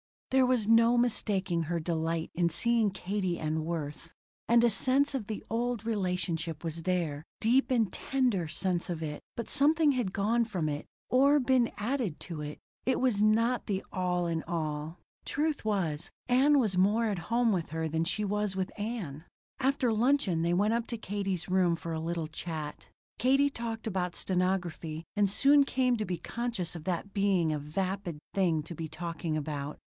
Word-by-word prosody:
There 260 -1 +5
was 250 -4 +1
no 230 +1 +5
mistaking 195 -7 +1
her 170 +2 -1
delight 165 0 -1
in 175 0 +2
seeing 230 +5 +2
Katie 190 -2 -2
and 155 0 -2
Worth. 165 -1 -4 0.4
And 235 0 +5
a 240 - +6
sense 265 +7 +2
of 245 -7 -3
the 215 - -5
old 235 0 -1
relationship 180 -6 -2
was 165 0 -4
there 165 -5 -1 0.2
deep 245 +5 +3
and 230 -7 +2
tender 245 -11 0
sense 175 +3 0
of 165 -2 -3
it; 150 -1 -5
but 235 - -5
something 300 +1 +4
had 245 -8 -1
gone 230 +4 +2
from 180 -8 -2
it, 145 0 -4 0.2
or 280 +3 +5
been 255 -2 +3
added 225 - -2
to 165 -4 -6
it. 150 0 -6 0.3
It 260 - +2
was 245 -6 +2
not 230 +3 +3
the 195 -3 -2
all 180 -1 0
in 165 -1 -1
all. 155 0 -3 0.3
Truth 300 -3 -1
was, 175 -8 -1 0.2
Ann 270 +4 +5
was 210 -7 +1
more 210 +5 +3
at 200 -4 -1
home 235 0 +3
with 175 -5 -1
her 160 +1 -2
than 160 +1 0
she 210 +5 -1
was 210 -1 -1
with 190 -1 -2
Ann. 195 - -4 0.3
After 265 -2 +2
luncheon 220 - +2
they 170 +1 +2
went 205 +5 +2
up 235 0 -1
to 235 - -3
Katie's 195 -4 -3
room 180 -2 +3
for 165 0 -6
a 160 - -2
little 165 0 -2
chat. 155 -1 -6 0.3
Katie 275 +3 +4
talked 230 -3 -5
about 180 -4 -2
stenography 175 -4 -1
and 205 -1 +3
soon 280 +7 +5
came 255 -2 +1
to 215 - -2
be 180 -3 -2
conscious 225 -2 -3
of 160 - -8
that 185 +2 -3
being 195 -5 +2
a 150 - -1
vapid 180 +3 -3 0.2
thing 170 -6 +2
to 170 - -7
be 165 0 -5
talking 165 0 -4
about. 145 -1 -4
190 Hz, 180 wpm, -30 LUFS, 165-235 Hz, 0.4 s, a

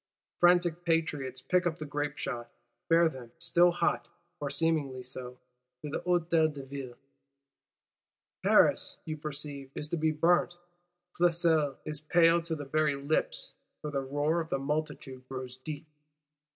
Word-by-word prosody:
Frantic 175 -1 +4
Patriots 145 -6 0
pick 180 -1 +2
up 165 -1 -2
the 155 - -6
grape 145 0 -3
shots; 120 -1 -5 0.3
bear 165 0 +6
them, 130 -6 -7
still 170 +1 +4
hot 175 -1 0 0.3
(or 145 - -3
seemingly 140 -3 +1
so), 125 0 -6 0.5
to 150 - -5
the - - -1
Hôtel 170 -3 +2
de 140 -2 -8
Ville:—Paris, 140 +1 -2
you 155 - -3
perceive, 145 -2 -5
is 150 - -3
to 170 - -1
be 160 0 +2
burnt! 175 +3 +2 0.6
Flesselles 165 -5 +3
is 150 -1 -4
"pale 165 +2 +4
to 165 -1 -2
the 145 -2 -6
very 150 +1 +1
lips" 330 - -1 0.3
for 150 - -3
the 140 -2 -1
roar 145 +5 0
of 160 - -7
the - - 0
multitude 135 -2 -4
grows 130 -1 -6
deep. 150 +3 -7
150 Hz, 145 wpm, -30 LUFS, 140-165 Hz, 0.6 s, bear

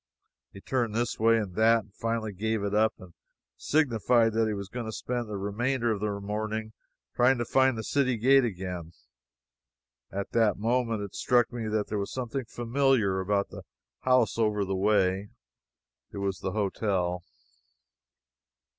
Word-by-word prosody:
He 100 - -11
turned 120 -3 -1
this 120 +1 -1
way 115 +1 +5
and 105 -5 -3
that, 115 +3 +4
and 100 0 -24
finally 115 -1 -2
gave 110 +2 -1
it 100 0 -2
up 110 +1 +3
and 90 -2 -14 0.4
signified 120 - +2
that 110 0 +2
he 110 - -1
was 100 -1 -5
going 120 +2 -5
to - - -3
spend 120 +1 -3
the 105 - -4
remainder 120 +5 -1
of 105 - -1
the 100 -1 -2
morning 110 +2 -3 0.4
trying 125 +2 +4
to 120 - -2
find 130 0 +3
the 110 - -4
city 130 0 +1
gate 135 +4 +5
again. 90 -6 -4 1.2
At 100 0 -4
that 110 -4 +2
moment 115 -1 0
it 100 - -7
struck 120 -1 +2
me 115 -2 -3
that 105 -1 0
there 105 - -1
was 100 - -4
something 130 0 -3
familiar 120 -4 +1
about 100 +1 0
the - - -8 0.4
house 125 -4 +2
over 105 -2 +1
the 95 - -2
way. 100 0 +2 0.8
It - - -8
was 100 -1 -2
the 95 - -3
hotel! 95 -4 -1
110 Hz, 165 wpm, -28 LUFS, 100-120 Hz, 1.2 s, way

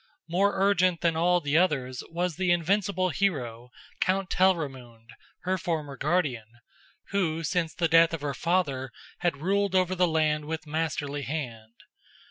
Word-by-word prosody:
More 190 +4 +2
urgent 185 -3 +3
than 170 -2 +2
all 175 +2 +3
the 145 +1 +2
others 130 -8 0
was 175 0 -2
the 185 0 -1
invincible 185 +2 +1
hero, 125 -12 -2 0.3
Count 190 0 0
Telramund, 135 -11 0 0.3
her 185 +1 0
former 155 -5 -3
guardian, 140 -7 0 0.6
who 165 -5 0
since 165 -1 -1
the 170 - +1
death 165 0 +5
of 165 -3 -4
her 145 -1 -2
father 140 -7 -1 0.3
had 175 -5 0
ruled 200 +1 +1
over 185 0 +3
the 180 -1 +2
land 155 -2 +1
with 160 +1 -4
masterly 150 -2 -2
hand. 120 -5 -5
165 Hz, 145 wpm, -27 LUFS, 145-185 Hz, 0.6 s, death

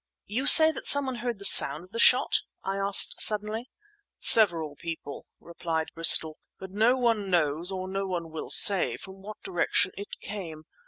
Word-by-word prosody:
"You 255 +8 -6
say 320 -1 +9
that - - -6
someone 270 -3 +2
heard 240 -1 -7
the 200 - -2
sound 150 -2 +6
of 185 - -21
the 230 - -8
shot?" 250 +2 +1 0.2
I 195 +1 -6
asked 195 0 -1
suddenly. 215 +3 -2 0.5
"Several 170 -9 +1
people," 160 -2 -11
replied 165 -1 -7
Bristol; 160 -1 +3 0.2
"but 190 0 -12
no 225 +6 -1
one 230 -5 -3
knows, 165 -1 -3
or 185 -1 -8
no 195 +1 -6
one 170 -3 -8
will 160 - -10
say, 195 -3 0
from 190 0 -15
what 210 +2 -14
direction 380 -1 -3
it 200 +1 -12
came. 170 -7 -11
195 Hz, 170 wpm, -24 LUFS, 170-220 Hz, 0.5 s, say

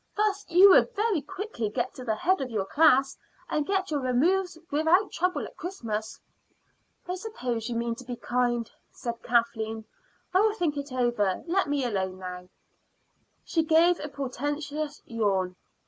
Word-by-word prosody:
Thus 415 -1 0
you 370 +4 +8
would 475 - +5
very 415 -6 +1
quickly 380 - -4
get 210 - -2
to 255 - -9
the 220 -3 0
head 370 - +1
of 260 - -3
your 210 -5 -1
class, 275 +1 +4 0.3
and 300 -1 -1
get 385 -3 0
your 295 - +1
removes 330 +9 +1
without 320 +7 +3
trouble 365 +2 -1
at - - -11
Christmas." 225 - -4 0.9
"I 360 - -2
suppose 255 - -4
you 235 - -3
mean 235 0 -1
to 240 - -10
be 245 0 -5
kind," 240 -1 0 0.2
said 235 -1 -6
Kathleen. 225 -2 0 0.5
"I 375 - +5
will 430 0 +2
think 340 -8 0
it 285 -1 -5
over. 240 -7 0
Let 355 -1 +1
me 285 -2 0
alone 190 -5 -2
now." 180 -1 -8 0.9
She 330 - +1
gave 325 +2 +4
a 300 - -5
portentous 290 +2 -4
yawn. 195 -5 0
280 Hz, 160 wpm, -27 LUFS, 230-355 Hz, 0.9 s, you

